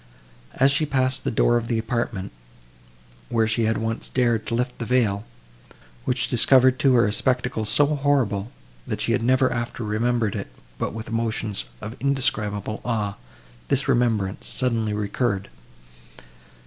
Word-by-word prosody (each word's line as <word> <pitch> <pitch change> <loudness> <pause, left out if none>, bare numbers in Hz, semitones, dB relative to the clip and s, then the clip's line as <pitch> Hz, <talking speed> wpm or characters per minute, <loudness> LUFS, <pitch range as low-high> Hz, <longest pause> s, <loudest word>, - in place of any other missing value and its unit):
As 135 +2 +4
she 150 +2 +1
passed 130 -1 +1
the - - 0
door 120 +2 +3
of 115 -1 -3
the 115 - 0
apartment, 115 -3 -2 1.0
where 115 -1 +2
she 110 +1 +1
had 110 +1 +1
once 115 +1 -3
dared 120 -4 +1
to 115 - -1
lift 125 +1 -2
the 115 - -3
veil, 115 -5 +1 0.8
which 125 -1 0
discovered 130 +2 +5
to 135 -2 +4
her 115 - +5
a 105 - 0
spectacle 125 -1 0
so 110 +8 +4
horrible, 135 -8 0 0.4
that - - -3
she - - -1
had - - +1
never 130 +2 +3
after 120 0 -4
remembered 110 0 0
it, - - -4 0.3
but - - -2
with 110 +1 -6
emotions 115 -2 -2 0.2
of 110 +2 -6
indescribable 110 -6 -1
awe, 105 -4 -1 0.5
this - - +1
remembrance 110 -5 +1
suddenly 115 -4 -1
recurred. 100 -1 -1
115 Hz, 150 wpm, -24 LUFS, 110-125 Hz, 1.0 s, discovered